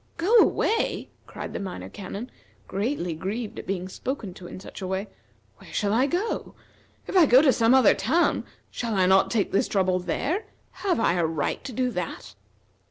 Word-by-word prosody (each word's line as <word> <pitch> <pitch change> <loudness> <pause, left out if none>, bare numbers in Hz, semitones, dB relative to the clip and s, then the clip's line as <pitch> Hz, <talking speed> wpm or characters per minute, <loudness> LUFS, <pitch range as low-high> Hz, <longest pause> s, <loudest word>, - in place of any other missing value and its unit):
"Go 375 +8 +2
away!" 455 0 +2 0.2
cried - - -7
the - - -3
Minor 190 -2 -6
Canon, 205 +5 -7 0.4
greatly 200 - -2
grieved 205 +7 -4
at - - -9
being 185 -1 -2
spoken 220 0 -5
to 180 0 -11
in - - -8
such 190 - -10
a 185 - -3
way. 190 +2 -2 0.5
"Where - - -15
shall 205 0 0
I 255 +5 +3
go? 375 +9 -2 0.5
If - - -6
I 350 -5 +7
go 250 +1 +7
to 275 -3 +5
some 230 +2 +4
other 260 -5 +6
town, 320 - +1 0.3
shall 230 -3 -3
I 190 -1 +3
not 190 +1 +4
take 215 -4 0
this 195 - +2
trouble 185 -2 +1
there? 335 - -2 0.4
Have 375 -8 +1
I 225 - +3
a 170 - +2
right 155 -3 -2
to 265 - -5
do 250 +1 0
that?" 180 -6 -5
215 Hz, 190 wpm, -26 LUFS, 185-265 Hz, 0.5 s, I